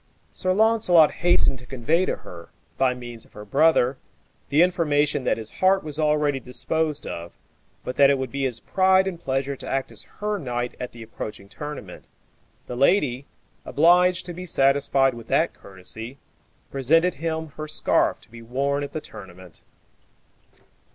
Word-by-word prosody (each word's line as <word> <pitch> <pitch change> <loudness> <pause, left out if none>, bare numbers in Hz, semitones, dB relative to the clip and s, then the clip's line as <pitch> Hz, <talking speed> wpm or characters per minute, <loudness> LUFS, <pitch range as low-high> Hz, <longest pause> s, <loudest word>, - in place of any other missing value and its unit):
Sir 185 - -1
Launcelot 200 -6 +4
hastened 175 -6 +2
to 125 - -15
convey 155 +8 0
to - - 0
her, 85 -1 -12 0.3
by 130 -2 +1
means 120 -2 -9
of - - -25
her 105 0 -10
brother, 135 0 +3 0.5
the 150 +4 +5
information 150 -6 +1
that - - +1
his 110 -1 -8
heart 190 +1 +2
was 150 0 -4
already 150 -2 +1
disposed 150 +4 -2
of, 85 0 -7 0.5
but 125 - -5
that 140 -1 +6
it 140 - +3
would 130 -2 -4
be 140 0 -2
his 120 -3 -2
pride 190 +4 +3
and 185 -3 -4
pleasure 135 -2 -2
to - - -9
act 135 0 -2
as - - -7
her 210 0 -2
knight 120 -4 -3
at 125 - -5
the 120 -1 -11
approaching 105 -2 -8
tournament. 150 +7 -8 0.6
The 125 - -6
lady, 140 -2 +2 0.4
obliged 180 +3 +3
to 175 - -6
be 180 +2 -8
satisfied 135 -2 +3
with 115 -1 -10
that - - +1
courtesy, 110 +7 -8 0.5
presented 165 +7 +2
him 160 -1 -2
her 155 +1 -8
scarf 155 - +3
to - - -20
be 115 0 -11
worn 140 +5 -1
at 140 - -7
the 155 - -4
tournament. 95 - -13
140 Hz, 165 wpm, -24 LUFS, 125-165 Hz, 0.6 s, that